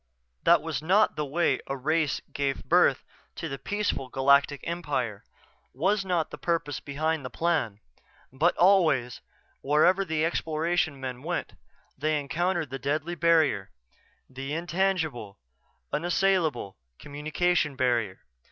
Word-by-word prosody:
That -, -, +5 dB
was -, -, -3 dB
not 190 Hz, +7 st, +3 dB
the 150 Hz, -1 st, -2 dB
way 145 Hz, -2 st, +1 dB
a 135 Hz, -, -3 dB
race 155 Hz, +2 st, 0 dB
gave 140 Hz, -1 st, -2 dB
birth -, -, +3 dB, 0.3 s
to 135 Hz, -, -4 dB
peaceful 205 Hz, -10 st, -2 dB
galactic 140 Hz, +2 st, +3 dB
empire, 140 Hz, -11 st, -3 dB, 0.5 s
was 195 Hz, +8 st, +1 dB
not 175 Hz, -4 st, -1 dB
the -, -, -8 dB
purpose 150 Hz, -7 st, -1 dB
behind 155 Hz, +3 st, -2 dB
the 125 Hz, -, -5 dB
Plan. 150 Hz, -9 st, -1 dB, 0.5 s
But 160 Hz, +7 st, +2 dB
always, 165 Hz, -, +3 dB, 0.4 s
wherever 155 Hz, +7 st, +3 dB
the 160 Hz, -3 st, 0 dB
Exploration 160 Hz, -2 st, -1 dB
men 130 Hz, -1 st, -5 dB
went, 175 Hz, +4 st, -3 dB, 0.4 s
they 155 Hz, 0 st, 0 dB
encountered 165 Hz, +2 st, -1 dB
the 135 Hz, -, -4 dB
deadly 150 Hz, +5 st, -2 dB
barrier; 160 Hz, -, +2 dB, 0.6 s
the 135 Hz, +2 st, -6 dB
intangible, 160 Hz, -, -1 dB, 0.6 s
unassailable 165 Hz, -, 0 dB, 0.2 s
communication 150 Hz, +1 st, -1 dB
barrier. 120 Hz, -7 st, 0 dB
155 Hz, 120 wpm, -27 LUFS, 135-170 Hz, 0.6 s, That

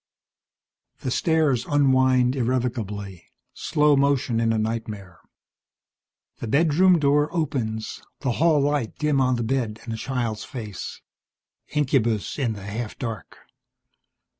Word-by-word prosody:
The 130 Hz, -, -2 dB
stairs 155 Hz, -6 st, +2 dB
unwind 130 Hz, -3 st, +3 dB
irrevocably, 115 Hz, -7 st, -2 dB, 0.3 s
slow 150 Hz, -1 st, +2 dB
motion 135 Hz, -4 st, +2 dB
in 115 Hz, -1 st, +2 dB
a 115 Hz, -, +1 dB
nightmare. 110 Hz, -5 st, -4 dB, 1.2 s
The 120 Hz, -, -6 dB
bedroom 165 Hz, +7 st, +4 dB
door 145 Hz, 0 st, +3 dB
opens, 120 Hz, -10 st, -2 dB, 0.2 s
the 130 Hz, -, 0 dB
hall 165 Hz, -3 st, +5 dB
light 140 Hz, -5 st, 0 dB
dim 150 Hz, -3 st, +1 dB
on 130 Hz, -1 st, +2 dB
the 120 Hz, -, -2 dB
bed 115 Hz, -3 st, -1 dB
and 115 Hz, -, -5 dB
the -, -, -4 dB
child's 120 Hz, -3 st, -3 dB
face. 110 Hz, -7 st, -7 dB, 0.7 s
Incubus 130 Hz, -7 st, 0 dB
in 120 Hz, -5 st, 0 dB
the 100 Hz, -2 st, -9 dB
half 110 Hz, +2 st, -5 dB
dark. 115 Hz, -4 st, -6 dB
125 Hz, 120 wpm, -24 LUFS, 110-145 Hz, 1.2 s, hall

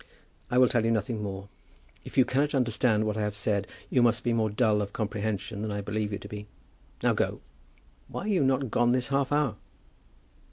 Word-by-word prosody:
"I 125 Hz, -, +1 dB
will 125 Hz, 0 st, +7 dB
tell 120 Hz, -1 st, +1 dB
you 115 Hz, -, +2 dB
nothing 110 Hz, 0 st, 0 dB
more. 100 Hz, -1 st, -5 dB, 0.6 s
If -, -, -10 dB
you 130 Hz, -, +7 dB
cannot 145 Hz, +3 st, +1 dB
understand 115 Hz, -3 st, +2 dB
what 105 Hz, 0 st, -1 dB
I -, -, -1 dB
have 105 Hz, -1 st, -1 dB
said, 100 Hz, -1 st, 0 dB, 0.2 s
you 125 Hz, -, +4 dB
must 120 Hz, 0 st, +3 dB
be 120 Hz, -, +1 dB
more 110 Hz, -2 st, +1 dB
dull 105 Hz, 0 st, +2 dB
of 100 Hz, 0 st, -4 dB
comprehension 105 Hz, -1 st, -3 dB
than 110 Hz, -1 st, -2 dB
I 100 Hz, 0 st, -2 dB
believe 105 Hz, +1 st, -2 dB
you 100 Hz, -, -2 dB
to 100 Hz, -, -10 dB
be. 105 Hz, 0 st, -7 dB, 0.6 s
Now -, -, +4 dB
go. -, -, -1 dB, 0.7 s
Why -, -, -5 dB
are -, -, -4 dB
you 195 Hz, -8 st, +2 dB
not 130 Hz, -2 st, +1 dB
gone 120 Hz, 0 st, +3 dB
this 125 Hz, 0 st, 0 dB
half 135 Hz, 0 st, +1 dB
hour?" 145 Hz, -6 st, +1 dB
110 Hz, 210 wpm, -28 LUFS, 105-125 Hz, 0.7 s, will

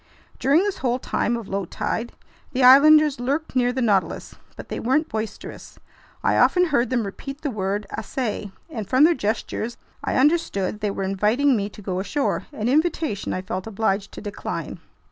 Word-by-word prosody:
During 290 Hz, +7 st, +4 dB
this 405 Hz, -1 st, -2 dB
whole 245 Hz, -1 st, 0 dB
time 240 Hz, -2 st, -1 dB
of 230 Hz, -4 st, -8 dB
low 195 Hz, -1 st, -2 dB
tide, 225 Hz, +7 st, -3 dB, 0.4 s
the 260 Hz, 0 st, +1 dB
islanders 295 Hz, +2 st, +7 dB
lurked 280 Hz, +5 st, -2 dB
near 245 Hz, -1 st, +3 dB
the 255 Hz, 0 st, -1 dB
Nautilus, 200 Hz, -5 st, 0 dB, 0.2 s
but -, -, -9 dB
they -, -, -4 dB
weren't 285 Hz, +7 st, +1 dB
boisterous. 220 Hz, 0 st, -6 dB, 0.5 s
I -, -, +2 dB
often 360 Hz, 0 st, +4 dB
heard 280 Hz, -7 st, +1 dB
them 250 Hz, -3 st, +1 dB
repeat 275 Hz, +8 st, -7 dB
the 290 Hz, -, -2 dB
word 205 Hz, -1 st, -2 dB
"assai," 215 Hz, -2 st, -4 dB, 0.2 s
and 220 Hz, -, -6 dB
from 255 Hz, +5 st, +5 dB
their 335 Hz, +2 st, +6 dB
gestures 225 Hz, -1 st, -3 dB, 0.3 s
I -, -, -1 dB
understood 260 Hz, -, +1 dB
they 210 Hz, -1 st, -1 dB
were 195 Hz, 0 st, -3 dB
inviting 215 Hz, +8 st, +2 dB
me 205 Hz, -2 st, -1 dB
to 210 Hz, -, -13 dB
go 185 Hz, -1 st, -2 dB
ashore, 275 Hz, +9 st, -1 dB
an 225 Hz, -6 st, -3 dB
invitation 305 Hz, -, 0 dB
I 185 Hz, -, -3 dB
felt 185 Hz, +2 st, -4 dB
obliged 205 Hz, -2 st, -1 dB
to -, -, -8 dB
decline. 205 Hz, -1 st, -5 dB
240 Hz, 180 wpm, -23 LUFS, 205-280 Hz, 0.5 s, islanders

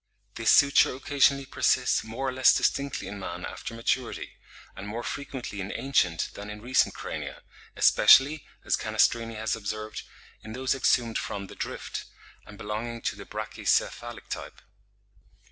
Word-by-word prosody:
This -, -, 0 dB
suture 140 Hz, -2 st, +5 dB
occasionally 140 Hz, 0 st, +2 dB
persists 130 Hz, -1 st, +2 dB
more 115 Hz, +5 st, -4 dB
or -, -, 0 dB
less 130 Hz, 0 st, +5 dB
distinctly 140 Hz, 0 st, 0 dB
in 100 Hz, -, -7 dB
man 95 Hz, -, -5 dB
after 115 Hz, -, -7 dB
maturity; 115 Hz, +2 st, -2 dB, 0.4 s
and 95 Hz, +1 st, -8 dB
more 115 Hz, +3 st, -4 dB
frequently 130 Hz, -7 st, -5 dB
in 95 Hz, -, -5 dB
ancient 90 Hz, -12 st, 0 dB
than 105 Hz, +1 st, -8 dB
in 105 Hz, 0 st, -7 dB
recent 125 Hz, +4 st, +2 dB
crania, -, -, -6 dB, 0.3 s
especially, 145 Hz, +3 st, +6 dB, 0.2 s
as -, -, +2 dB
Canestrini 115 Hz, -1 st, +1 dB
has 110 Hz, +1 st, -1 dB
observed, 110 Hz, 0 st, -5 dB, 0.4 s
in 110 Hz, -, -8 dB
those 130 Hz, +2 st, 0 dB
exhumed 120 Hz, -3 st, +2 dB
from 100 Hz, -1 st, -5 dB
the -, -, -12 dB
Drift, -, -, -5 dB, 0.4 s
and 105 Hz, -, -12 dB
belonging 115 Hz, +3 st, -5 dB
to -, -, -1 dB
the -, -, -10 dB
brachycephalic 120 Hz, -1 st, -2 dB
type. -, -, -7 dB
115 Hz, 145 wpm, -27 LUFS, 105-130 Hz, 0.4 s, especially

